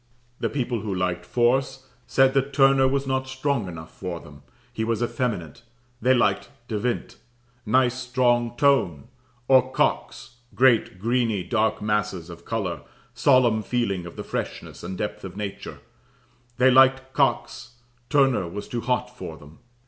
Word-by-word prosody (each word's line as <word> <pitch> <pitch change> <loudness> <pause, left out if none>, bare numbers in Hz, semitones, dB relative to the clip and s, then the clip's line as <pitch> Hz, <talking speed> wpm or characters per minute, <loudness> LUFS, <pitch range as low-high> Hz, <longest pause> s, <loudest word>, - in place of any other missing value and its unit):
The - - -1
people 125 -4 -2
who 100 -2 -4
liked 90 -1 -2
force, 130 +2 +1 0.2
said 135 0 +4
that 135 0 0
"Turner 135 -1 +5
was 140 +1 0
not 130 0 -1
strong 130 -4 -1
enough 80 -2 -9
for 90 -3 -5
them; 75 -2 -14 0.3
he 110 - -2
was 115 +1 0
effeminate; 115 - -3 0.4
they 130 +3 +4
liked 120 - +1 0.2
De 110 -2 -2
Wint, 120 +2 -3 0.5
nice 130 +2 +2
strong 120 -2 +1
tone; 110 - +2 0.4
or 130 -1 +4
Cox 120 -2 -1 0.2
great, 120 -7 +3
greeny, 115 -1 0
dark 110 -1 0
masses 105 -5 -1
of 85 - -12
colour 100 -7 -3 0.3
solemn 120 -2 +3
feeling 100 -6 -2
of 85 - -11
the - - -6
freshness - - -5
and 90 +2 -5
depth 105 - -4
of 95 0 -8
nature; 100 -2 -6 0.8
they 130 +1 +5
liked 130 0 +4
Cox 120 -2 -1 0.3
Turner 135 - +3
was 100 +5 -7
too 120 - -4
hot 125 +1 -2
for 80 -9 -8
them." 75 +2 -16
120 Hz, 150 wpm, -24 LUFS, 100-130 Hz, 0.8 s, Turner